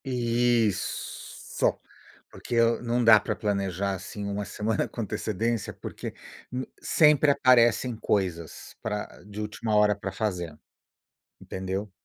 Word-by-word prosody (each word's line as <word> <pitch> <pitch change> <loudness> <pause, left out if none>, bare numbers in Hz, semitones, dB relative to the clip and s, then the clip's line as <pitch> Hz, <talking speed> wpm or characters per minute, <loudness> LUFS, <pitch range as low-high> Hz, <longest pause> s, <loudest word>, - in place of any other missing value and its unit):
Isso. 120 -3 +1 1.2
Porque 120 - -5
eu 115 0 +3
não 120 0 0
dá 110 -2 +8
pra - - -3
planejar, 100 -2 -1
assim, 100 +3 -7
1 100 0 -3
semana 110 +1 -1
com 120 - -6
antecedência, 110 +1 -2
porque - - -7 0.4
m 130 +1 -3 0.2
sempre 150 -2 +5
aparecem 125 -2 +4
coisas 90 -7 -2
pra 105 -1 -2 0.2
de 105 +1 -7
última 105 +1 -2
hora 105 0 +5
pra 100 -1 -5
fazer. 90 -6 -3 0.8
Entendeu? 95 +2 -4
105 Hz, 120 wpm, -27 LUFS, 100-120 Hz, 1.2 s, dá